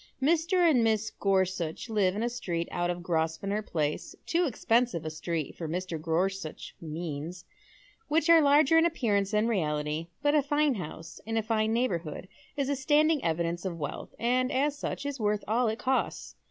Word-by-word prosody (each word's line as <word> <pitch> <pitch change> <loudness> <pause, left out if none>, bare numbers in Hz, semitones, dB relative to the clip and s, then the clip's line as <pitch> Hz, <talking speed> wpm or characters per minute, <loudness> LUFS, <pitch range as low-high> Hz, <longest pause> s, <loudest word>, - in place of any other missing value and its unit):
Mr. 335 +5 +3
and 260 -8 +4
Mrs. 220 0 +1
Gorsuoh 185 -4 +1
live 200 -4 +2
in 215 - -1
a 240 - +1
street 175 -8 -3
ont 175 0 0
of 175 0 -6
Grosvenor 170 +5 -1
Place, 155 -7 -2
too 345 +1 +2
expensive 230 - +1
a 155 - -3
street 160 -1 -3
for 165 - -5
Mr. 175 -1 -3
Gorsuch's 170 +1 -2
means, 165 +1 -5 0.6
which 310 +1 +2
are 335 -1 +7
larger 290 +2 +5
in 325 - +4
appearance 205 - 0
than 215 +1 +1
reality; 155 -5 -1 0.2
but 290 0 +3
a 300 - +5
fine 290 +1 +2
house 165 -4 -7
in 225 0 -1
a 225 - +1
fine 220 0 +1
neighbour 230 -6 +1
hood 165 +2 -8 0.3
is 280 -2 0
a 285 - 0
standing 300 +2 +3
evidence 170 +1 -1
of 180 -3 -3
wealth, 145 -3 -6
and 250 +3 +1
as 280 +2 +1
such 285 - -4
is 285 -2 -3
worth 210 -1 0
all 235 +3 +2
it 220 0 -1
costs. 260 +2 -1
210 Hz, 180 wpm, -29 LUFS, 170-265 Hz, 0.6 s, are